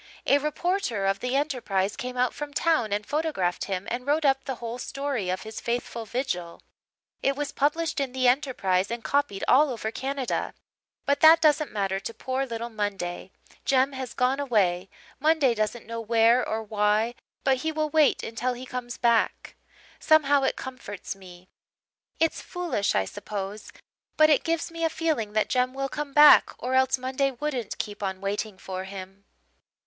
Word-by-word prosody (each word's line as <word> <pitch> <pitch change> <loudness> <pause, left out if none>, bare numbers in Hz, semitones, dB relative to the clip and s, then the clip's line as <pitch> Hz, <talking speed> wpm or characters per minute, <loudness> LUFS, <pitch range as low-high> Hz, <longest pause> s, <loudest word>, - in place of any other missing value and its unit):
A 285 - +4
reporter 300 - -1
of 195 0 +1
the 250 +3 -2
Enterprise 235 -9 0
came 250 0 -5
out 250 -1 +1
from 295 -1 -7
town 310 -11 +2
and 205 +1 -1
photographed 290 - -1
him 190 0 -4
and 250 +3 -3
wrote 300 +2 +2
up 270 -1 +3
the 265 - -3
whole 235 +1 -6
story 275 -8 -3
of 185 - -2
his 220 0 -7
faithful 235 -1 -3
vigil. 225 -9 -3 0.6
It 275 - +1
was 290 0 -3
published 315 +2 0
in 275 -2 -1
the 255 0 +1
Enterprise 245 -9 +1
and 235 0 -4
copied 280 -9 0
all 290 +3 +5
over 220 -3 -3
Canada. 270 +1 -3 0.5
But 280 0 +2
that 320 +1 +8
doesn't 305 -1 +3
matter 195 -2 -1
to 225 +4 -7
poor 265 +1 -2
little 235 0 -5
Monday, 195 -4 -3 0.3
Jem 270 0 +3
has 260 -2 -6
gone 255 +2 +1
away 195 -9 +1 0.3
Monday 300 -4 +3
doesn't 215 +1 -2
know 230 +1 -5
where 230 +2 +4
or 220 0 -2
why 215 +2 +1 0.3
but 270 -1 +3
he 315 +5 -2
will 310 -1 -2
wait 310 -2 +3
until 240 +3 -2
he 250 +1 -8
comes 250 -1 -6
back. 235 -1 +1 0.4
Somehow 290 -3 +4
it 265 - +1
comforts 255 -8 -7
me: 180 -2 -14 0.7
it's 325 0 +1
foolish, 350 - -2
I 95 - +2
suppose, 200 - -6 0.5
but 310 0 +6
it 295 - +4
gives 330 0 -1
me 330 0 -5
a 325 - +3
feeling 310 -11 -1
that 215 0 +2
Jem 255 0 0
will 275 0 -2
come 295 +1 -4
back 295 +1 +7
or 250 +2 -3
else 260 0 +3
Monday 260 +2 0
wouldn't 260 -4 -4
keep 205 -1 -5
on 190 -1 -3
waiting 200 +1 -3
for 185 0 -6
him. 195 0 -9
250 Hz, 175 wpm, -26 LUFS, 210-285 Hz, 0.7 s, that